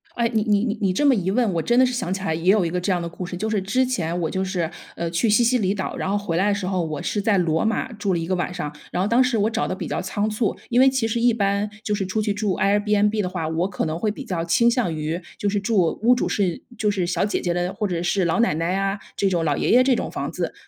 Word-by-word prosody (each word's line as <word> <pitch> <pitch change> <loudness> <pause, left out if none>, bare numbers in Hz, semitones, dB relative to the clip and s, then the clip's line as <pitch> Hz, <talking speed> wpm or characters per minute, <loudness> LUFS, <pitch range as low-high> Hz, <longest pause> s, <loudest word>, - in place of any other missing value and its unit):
哎， 235 -1 +1
你 220 - +2
你 210 0 +2
你 215 -3 -1
你 195 - +2
这 290 - +1
么 275 - +6
一 190 -6 0
问， 220 -1 +1
我 165 - 0
真 240 +6 +1
的 255 - +6
是 250 - -1
想 190 -7 -2
起 190 0 -2
来 160 - 0
也 170 +4 +2
有 200 -3 +3
一 165 - -2
个 180 0 -1
这 195 - 0
样 180 - +1
的 170 - -4
故 170 +2 -7
事， 180 0 -5
就 215 +4 -2
是 205 -3 +1
之 255 +7 +1
前 175 -9 -2
我 160 - -1
就 190 0 -1
是， 180 -3 -2 0.2
呃， 170 - -3
去 195 +7 +1
西 215 +3 +4
西 245 +1 +3
里 195 0 0
岛， 190 - -4
然 190 - -3
后 205 - +1
回 200 -5 -3
来 195 +3 +2
的 205 - +2
时 205 - -4
候 185 -2 0
我 155 -3 -4
是 205 - -1
在 205 -1 +2
罗 165 -2 +1
马 225 +3 -1
住 205 -2 -1
了 170 - 0
1 165 - -3
个 185 - -1
晚 180 0 -1
上， 150 -5 -5 0.2
然 180 - -1
后 200 - 0
当 245 +3 +4
时 250 -3 +1
我 210 +1 +2
找 230 +1 -1
的 - - -2
比 - - -5
较 - - -2
仓 205 +3 -2
促， 215 0 -1
因 240 - +3
为 265 +1 +7
其 260 -4 0
实 230 +1 -1
一 240 0 +5
般 200 -1 0
就 210 - -1
是 200 - -1
出 190 +3 -2
去 210 -1 0
住 205 -2 -1
Airbnb 210 +1 +2
的 180 - -2
话， 180 -4 -3
我 165 +4 -1
可 180 - -2
能 160 +2 -3
会 215 - 0
比 265 +6 -5
较 175 -7 -2
倾 235 +8 +3
向 230 -10 0
于 155 +3 -3 0.2
就 205 - -1
是 205 0 0
住 195 -5 +1
屋 240 +3 +5
主 - - -1
是 185 -5 -1 0.2
就 210 - +2
是 195 -4 0
小 175 0 0
姐 205 - 0
姐 175 - -1
的， 175 +1 -1
或 210 - -1
者 175 -2 -2
是 180 +1 +1
老 170 +6 +1
奶 230 -9 +2
奶 165 +3 -1
啊， 195 +1 0 0.2
这 200 - +1
种 170 -3 0
老 145 -2 +1
爷 - - -1
爷 255 +1 +6
这 260 -2 +3
种 - - -3
房 - - -4
子。 - - -3
195 Hz, 355 characters per minute, -23 LUFS, 175-220 Hz, 0.2 s, 为